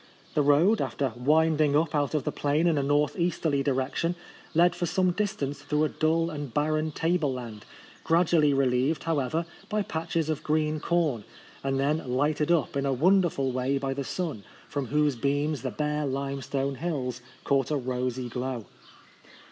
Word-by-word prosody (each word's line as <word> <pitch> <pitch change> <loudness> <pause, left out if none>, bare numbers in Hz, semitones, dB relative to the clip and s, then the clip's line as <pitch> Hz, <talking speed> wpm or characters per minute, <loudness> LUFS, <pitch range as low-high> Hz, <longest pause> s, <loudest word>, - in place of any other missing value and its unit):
The 150 - +2
road, 150 +10 +4
after 135 -4 -1
winding 150 +3 +3
up 160 +1 +2
out 145 0 0
of 150 - 0
the - - -1
plain 145 +3 0
in 165 -4 +3
a - - +1
north 145 +3 +1
easterly 160 -4 +1
direction, 135 +5 0 0.4
led 175 +1 +5
for 175 0 -2
some 185 +1 +2
distance 175 -8 -2
through 150 +1 0
a 155 - +2
dull 165 +1 +1
and 145 -4 -5
barren 155 +3 0
table 165 -2 0
land, 115 -5 -7 0.4
gradu 170 +1 +3
ally 150 -1 +4
relieved, 135 +2 +1
however, 160 +1 0 0.2
by 210 0 0
patches 165 -2 -2
of 155 -1 -2
green 155 0 0
corn, 155 -10 0 0.4
and 135 0 0
then 145 +3 +1
lighted 150 +4 +1
up 160 -7 +1
in 140 0 0
a - - +1
wonderful 160 -2 +2
way 130 +2 0
by 135 0 -2
the 140 +1 -3
sun, 150 - -4 0.2
from 140 -3 -3
whose 150 0 +2
beams 145 +3 0
the 130 - -2
bare 150 +4 -1
lime 135 0 -3
stone 140 0 -2
hills 130 -8 -2 0.2
caught 135 -2 +1
a 150 - +1
rosy 125 -1 -2
glow. 125 -1 -4
145 Hz, 175 wpm, -27 LUFS, 135-160 Hz, 0.4 s, led